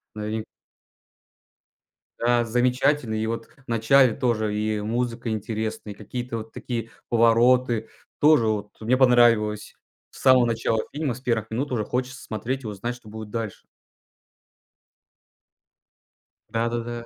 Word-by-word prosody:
новин 110 +1 -3 1.8
Да, 120 0 +2
замечательный. 125 0 +1
И 110 - -1
вот 115 0 -3
в 140 -3 -26
начале 120 +2 +4
тоже 110 -4 0
и, 105 0 0
э, 105 - -4
музыка 115 +1 -2
интересная, 110 -1 -3
и - - -21
какие-то 120 +3 -5
вот 110 0 -8
такие 115 -2 -4 0.2
повороты. 115 0 +3 0.3
Тоже 150 -6 +5
вот 105 -1 -1
мне 120 +4 +2
понравилось. 120 -5 +3 0.4
С - - -14
самого 130 -2 +6
начала 115 -1 0
фильма, 145 -4 -2
с 130 - -12
1 115 -3 -1
минут 130 +6 -3
уже 115 -4 0
хочется 125 0 -3
смотреть 125 +5 -4
и 110 - -5
узнать, 105 +4 -4
что 120 -3 -15
будет 110 -1 -8
дальше. 115 -4 -4 2.9
Да-да-да. 115 +1 -2
115 Hz, 130 wpm, -24 LUFS, 110-125 Hz, 2.9 s, самого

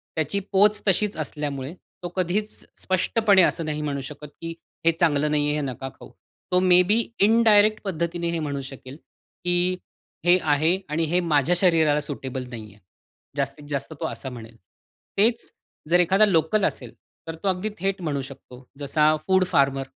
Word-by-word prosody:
त्याची 160 +5 -1
पोच 205 +1 +4
तशीच 200 +1 +1
असल्यामुळे, 145 -1 -4 0.3
तो 175 - -3
कधीच 190 +4 -1 0.3
स्पष्टपणे 195 +2 +3
असं 170 -2 +1
नाही 150 0 -3
म्हणू 140 -2 -3
शकत, 150 +2 -9
की 165 0 -5 0.3
हे 165 - +6
चांगलं 150 -2 +2
नाही 150 -1 +1
आहे, 150 - +1
हे 150 - -1
नका 135 +2 -6
खाऊ. - - -13 0.4
तो 180 - +4
मेबी 185 +4 +4 0.2
इनडायरेक्ट 215 -1 +5
पद्धतीने 170 -2 -2
हे 170 - -2
म्हणू 140 -3 -3
शकेल 130 0 -10 0.5
की 180 +1 +1 0.5
हे 175 +1 +6
आहे 155 +4 +2
आणि 155 +2 0
हे 180 - +3
माझ्या 150 +4 +3
शरीराला 160 -5 +3
सुटेबल 135 -3 -5
नाही 110 -4 -9
आहे. 105 - -22 0.6
जास्तीत 140 +1 -3
जास्त 145 +2 -3
तो - - -3
असा 130 - -6
म्हणेल. 115 -2 -11 0.6
तेच 230 +3 +2 0.4
जर 175 +1 +4
एखादा 190 +4 +4
लोकल 190 +2 +1
असेल, - - -4 0.3
तर 165 - -5
तो - - -1
अगदी 190 +3 0
थेट 195 0 -1
म्हणू 145 -5 -2
शकतो. 130 -1 -12
जसा 150 +2 +2
फूड 190 -1 +4
फार्मर 140 -6 +1
165 Hz, 165 wpm, -24 LUFS, 145-185 Hz, 0.6 s, हे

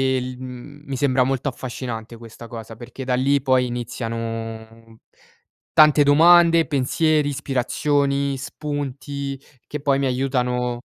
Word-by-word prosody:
il 125 0 -4
mhmm, 130 +3 -10
mi 140 - -4
sembra 130 -1 +2
molto 135 +2 -1
affascinante 120 -2 -6
questa 115 0 -12
cosa, 115 -1 -9
perché 120 +4 -9
da 125 -1 0
lì 140 +2 +2
poi 130 -2 +2
iniziano 115 -1 -6 0.7
tante 150 -1 +6
domande, 165 +2 +6
pensieri, 150 +2 +1
ispirazioni, 140 +1 0
spunti 140 -1 -5 0.3
che 150 - -6
poi 140 -2 +2
mi 140 - 0
aiutano 125 -2 -1
130 Hz, 120 wpm, -22 LUFS, 120-145 Hz, 0.7 s, tante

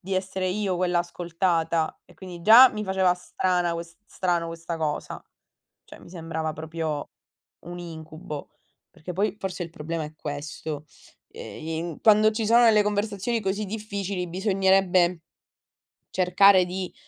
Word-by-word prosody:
di 190 +2 -4
essere 190 0 -2
io 190 -1 -1
quella 180 -1 +1
ascoltata 170 -2 -1
e 180 - -19
quindi 175 0 -10
già 235 +7 +9
mi 215 0 -4
faceva 190 -1 +2
strana 180 -1 -1
ques 170 0 -8
strano 175 -2 -1
questa 165 0 -6
cosa, 150 -2 -3 0.6
cioè - - -14
mi - - -15
sembrava 160 -2 -4
proprio 160 -2 -4 0.6
un 175 0 -7
incubo, 160 -3 -8 0.4
perché 180 +3 -8
poi 205 +4 -1
forse 185 -2 -4
il 170 - -9
problema 165 0 -4
è 150 +1 -9
questo. 150 0 -6 0.4
E 160 +1 -7
in 165 -1 -5
quando 215 0 +5
ci 220 0 -2
sono 235 +2 +6
delle 215 -2 +6
conversazioni 210 +2 -1
così 200 +1 -2
difficili 200 -3 -4
bisognerebbe 190 -2 +2 0.9
cercare 185 +1 +5
di, 185 0 -5
180 Hz, 140 wpm, -25 LUFS, 165-195 Hz, 0.9 s, già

